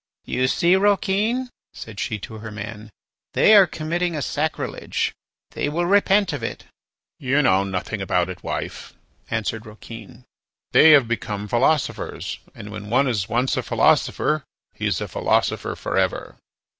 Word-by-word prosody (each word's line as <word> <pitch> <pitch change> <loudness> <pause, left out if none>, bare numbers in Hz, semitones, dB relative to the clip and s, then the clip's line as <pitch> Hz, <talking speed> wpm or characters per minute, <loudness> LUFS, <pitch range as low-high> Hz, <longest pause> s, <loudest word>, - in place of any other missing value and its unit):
"You 130 0 0
see, 170 +7 +3
Rouquin," 205 +5 +1 0.2
said 110 -2 -9
she 110 - -2
to 110 +1 -8
her 110 0 -7
man, 105 +1 -8 0.4
"they 220 - +5
are 200 -3 +8
committing 170 +2 -2
a 145 - -2
sacrilege. 155 +1 -2 0.4
They - - -2
will 170 +4 -1
repent 195 -1 +3
of 145 - -4
it." 115 - -5 0.5
"You 140 +3 +2
know 95 -6 +4
nothing 100 +2 -4
about 90 -2 +1
it, 90 -1 -8
wife," - - -5 0.3
answered 115 0 -3
Rouquin; 110 +2 -11 0.5
"they, 160 - +7
have 140 -5 +6
become 105 -3 -3
philosophers, 130 +7 0 0.2
and - - -9
when 105 - -8
one 130 +4 +3
is 105 -6 -1
once 125 +3 +1
a - - +1
philosopher 155 -1 +2 0.3
he - - -3
is - - -1
a - - -3
philosopher - - 0
for - - -4
ever." - - -2
130 Hz, 155 wpm, -22 LUFS, 110-170 Hz, 0.5 s, are